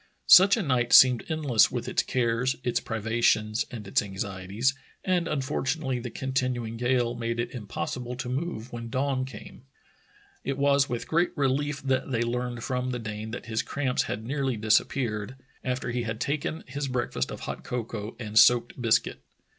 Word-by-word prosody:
Such 195 +4 +8
a 220 - -1
night 125 -5 +1
seemed 125 -3 +8
endless 145 -8 +3
with - - -4
its - - +1
cares, 125 +1 0
its 120 - +1
privations, 110 0 0
and 110 -5 -8
its - - +2
anxieties, 100 +4 -2 0.3
and 180 -3 +1
unfortu 140 0 -1
nately 135 -5 -2
the 120 +1 -5
continuing 125 -2 -2
gale 120 0 +1
made 115 0 -3
it 120 - -2
impossible 125 +2 -5
to 125 0 -5
move 125 -3 -4
when 115 -1 -6
dawn 130 +1 0
came. 130 - -11 0.8
It 135 -1 -2
was 140 0 +3
with 120 -1 -3
great 170 +1 +1
relief 140 +1 0
that 135 0 0
they 120 -3 0
learned 120 0 -3
from 125 -1 -2
the 125 - -2
Dane 110 -1 -6
that 120 - -7
his 110 -1 -1
cramps 135 -3 -1
had 110 - -3
nearly 135 -2 -1
disappeared, 110 +1 0 0.3
after 125 -1 -2
he 120 0 -1
had 110 -1 -4
taken 145 +4 -2
his 140 +2 -4
breakfast 120 - -2
of - - -7
hot - - -6
cocoa 115 -3 -5
and 110 -2 +2
soaked 120 +1 +4
biscuit. 115 -2 +1
125 Hz, 170 wpm, -27 LUFS, 115-135 Hz, 0.8 s, Such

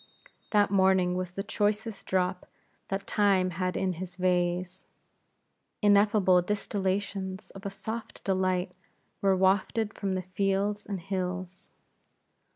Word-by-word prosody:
That 205 -2 +3
morning 190 -2 +4
was 180 -1 -3
the 195 - -3
choicest 210 0 -1
drop 185 0 0 0.4
that 195 0 -3
Time 195 -3 +2
had 185 +1 -2
in 185 -1 0
his 180 +1 -7
vase. 180 0 0 1.0
Ineffable 205 -3 +5
distillations 195 0 -2
of 195 +1 -7
a - - -2
soft 220 +4 -6
delight 185 -1 0 0.5
were 195 -1 +3
wafted 200 +3 +2
from 195 -2 -2
the 185 - -2
fields 195 +2 -1
and 200 -2 -3
hills. 185 0 -4
190 Hz, 120 wpm, -29 LUFS, 185-200 Hz, 1.0 s, Ineffable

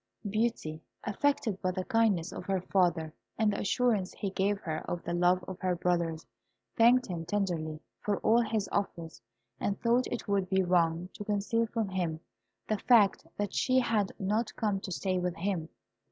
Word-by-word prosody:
Beauty, 210 -7 -1 0.2
affected 220 -2 0
by 185 - +1
the 185 0 -2
kindness 210 -7 +2
of - - -7
her 195 -1 0
father, 175 -4 +1 0.2
and 215 -2 +2
the - - -3
assurance 210 -2 +1
he 200 - -3
gave 200 +2 +1
her 160 -4 -3
of 175 - -3
the 170 - -3
love 180 +1 +3
of 190 -1 -6
her 185 -1 0
brothers, 170 -2 0 0.5
thanked 245 +2 +5
him 170 -3 -4
tenderly 170 -4 -2 0.2
for 205 -1 -1
all 230 +2 +4
his 220 -3 -1
offers, 165 -9 -3 0.4
and 200 - -1
thought 240 +1 +2
it 240 - -5
would 195 -2 +1
be 190 -1 +3
wrong 175 -1 +2
to - - -7
conceal 210 +3 0
from 220 -2 -2
him 175 -4 -2 0.5
the 215 -1 0
fact 210 -8 +4
that 205 -1 -2
she 255 0 +2
had 220 -6 +2
not 210 +4 -1
come 205 -3 0
to 190 - -7
stay 185 0 -1
with 180 -1 -1
him. 170 -3 -2
195 Hz, 180 wpm, -30 LUFS, 175-215 Hz, 0.5 s, thanked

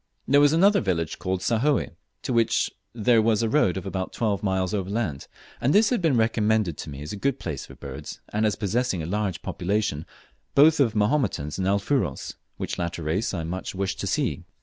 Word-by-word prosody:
There 140 +1 +5
was 145 0 +6
another 195 +6 +4
village 85 -6 -1
called 95 0 -2
Sahoe, 125 +7 +1 0.3
to 130 - -2
which 115 -1 +2 0.2
there 115 0 +3
was 110 0 +2
a 115 - +1
road 110 - +2
of 95 - -5
about 95 -1 -3
twelve 105 -4 0
miles 95 -2 0
overland, 100 -7 -2 0.3
and 135 +5 +2
this 215 +3 +5
had 245 - +1
been 155 -7 +3
recommended 110 -5 +2
to - - -6
me 70 0 -7
as 75 - -6
a - - -3
good 135 +6 0
place 80 - -5
for - - -12
birds, - - -8
and 105 +1 -1
as 105 -2 +2
possessing 105 -3 -1
a - - -4
large 100 +1 -2
population 90 -5 -1 0.5
both 150 +3 +6
of 115 -6 +3
Mahomotans 105 - 0
and 95 - 0
Alfuros, 100 - 0 0.2
which - - -4
latter 85 -1 -3
race 85 +9 0
I 85 -4 -3
much 90 +4 -5
wished 100 +1 -2
to - - -2
see. - - -1
105 Hz, 200 wpm, -25 LUFS, 95-120 Hz, 0.5 s, was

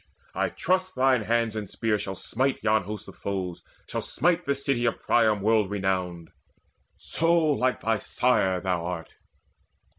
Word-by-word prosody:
I - - 0
trust 185 0 0
Thine 130 -2 +3
hands 115 -1 +1
and 105 -3 -4
spear 110 -2 0
shall 95 -1 -4
smite 130 +8 -1
yon 110 -3 +2
hosts 105 +1 -6
of - - -11
foes, 95 -3 -4 0.3
Shall - - -3
smite 175 0 0
the 140 - +2
city 135 -3 0
of 115 - 0
Priam 110 -3 +3
world 110 -1 +3
renowned 95 -4 -2 0.7
So 165 +1 0
like 140 -5 +1
thy 110 -1 +1
sire 95 -8 +1
thou 90 -2 -1
art! 85 -2 -5
110 Hz, 155 wpm, -26 LUFS, 95-130 Hz, 0.7 s, Thine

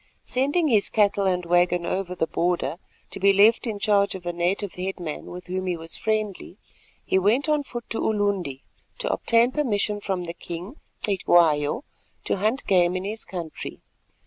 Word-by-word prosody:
Sending 285 +6 +1
his 215 -7 +3
cattle 200 -2 +2
and 180 -1 0
waggon 175 0 +2
over 185 0 -2
the 160 - 0
border 170 0 -1 0.3
to - - -4
be 200 +1 +5
left 210 +5 +5
in 215 -2 -2
charge 200 -1 +2
of 180 -2 -9
a 175 - -2
native 180 +3 -1
headman 180 -4 -5
with 180 0 -8
whom 185 +1 -3
he 180 -2 -1
was 165 0 -5
friendly, 215 -3 -2 0.5
he 190 - +2
went 225 +10 +2
on 300 -1 +2
foot 240 -4 -7
to 225 - -3
Ulundi 200 -10 -1 0.3
to - - -1
obtain 230 +2 +3
permission 210 -7 0
from 190 -3 -2
the 170 -1 -5
king, 175 - -8 0.3
Cetywayo, 170 - +3 0.4
to - - -1
hunt 220 +8 0
game 180 -2 +3
in 185 - -2
his 215 +3 -4
country. 170 -4 -7
195 Hz, 175 wpm, -25 LUFS, 175-215 Hz, 0.5 s, be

